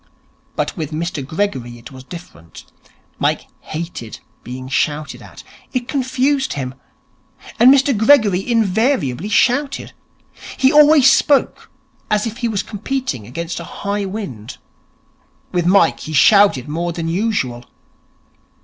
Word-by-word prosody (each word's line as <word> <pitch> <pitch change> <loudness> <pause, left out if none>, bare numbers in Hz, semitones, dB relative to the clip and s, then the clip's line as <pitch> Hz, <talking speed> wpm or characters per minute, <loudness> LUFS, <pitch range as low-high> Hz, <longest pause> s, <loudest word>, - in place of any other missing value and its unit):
But - - -2
with 160 -6 -4
Mr 160 -2 -4
Gregory 130 -7 -3
it 120 +2 -13
was 130 -1 -11
different. 135 - -12 0.5
Mike - - 0
hated 155 -8 -7 0.2
being 130 +1 -7
shouted 150 +2 -2
at. - - -13 0.3
It 245 -2 -2
confused 270 0 0
him. 130 -2 -4 0.9
And 245 +3 +8
Mr 275 -1 +3
Gregory 215 -3 +3
invariably 215 - +1
shouted. 275 +6 +1 0.6
He 265 0 +3
always 295 -2 +7
spoke 285 -2 +1 0.4
as 210 +1 +1
if 230 0 -5
he 240 - -1
were 220 -3 -3
competing 205 - -4
against 170 +7 -5
a - - -6 0.2
high 200 0 -1
wind. 190 - -7 0.9
With 175 -1 0
Mike 180 -3 +4
he 155 - -7
shouted 200 - +5
more 170 +3 -2
than 165 -1 -4
usual. 165 - -1
195 Hz, 125 wpm, -18 LUFS, 145-245 Hz, 0.9 s, And